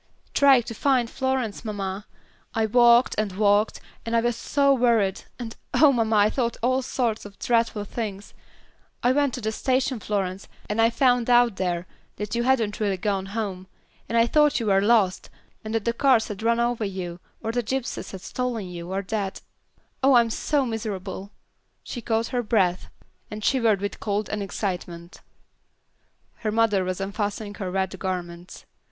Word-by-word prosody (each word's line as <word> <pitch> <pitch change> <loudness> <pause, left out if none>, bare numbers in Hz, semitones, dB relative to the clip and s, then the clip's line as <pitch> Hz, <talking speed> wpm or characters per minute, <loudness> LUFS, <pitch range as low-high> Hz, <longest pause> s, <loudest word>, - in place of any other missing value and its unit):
"Trying 275 -4 +6
to 230 - -6
find 255 0 +2
Florence, 260 -5 -2
mamma. 200 -2 -4 0.5
I 225 -1 +2
walked 240 +2 +5
and 210 -3 -1
walked, 205 +2 +2 0.2
and 230 0 -2
I 230 - +4
was 240 0 0
so 280 +4 +2
worried, 230 -7 +2
and 230 -2 -7 0.2
oh, 300 -2 +7
mamma, 225 -3 +1
I 205 0 +5
thought 235 -3 -1
all 255 +2 +2
sorts 240 -4 -1
of 205 -1 -12
dreadful 230 -3 +1
things. 205 -3 -5 0.7
I 245 - +4
went 285 -1 +1
to 250 - -6
the 220 0 -1
station, 255 +1 0
Florence, 195 -2 -3 0.2
and 210 +2 0
I 225 - +5
found 245 0 +2
out 240 -4 +4
there 175 -2 -1 0.3
that 210 0 -5
you 235 - +1
hadn't 240 -4 +1
really 200 -3 0
gone 195 0 -1
home; 195 -3 -4 0.4
then 230 - 0
I 230 - +5
thought 295 +3 +3
you 230 - -3
were 195 -2 +3
lost, 205 -3 +2 0.3
or 215 - -6
that 225 -1 -1
the 235 - +1
cars 250 -2 +3
had 210 -1 -6
run 230 +1 +2
over 235 -1 0
you, 185 -3 -4 0.2
or 225 - -1
the 245 +1 0
gypsies 260 +2 -3
had 190 - -8
stolen 245 -2 -3
you, 175 0 -7
or 195 +1 -2
that 200 -1 -3 0.6
oh 270 0 +5
I'm 235 -1 +4
so 285 +3 0
miserable," 200 -4 -5 0.5
she 240 - -6
caught 225 0 0
her 250 -2 0
breath, 195 -6 +1 0.4
and 210 0 -7
shivered 230 -6 +3
with 200 0 -4
cold 210 0 -2
and 210 - -3
excitement. 180 -3 -5 1.2
Her 215 -2 -2
mother 215 -3 +2
was 185 0 -3
unfastening 205 +1 -3
her 190 -4 -5
wet 190 0 -2
garments. 180 -1 -5
220 Hz, 175 wpm, -25 LUFS, 195-240 Hz, 1.2 s, oh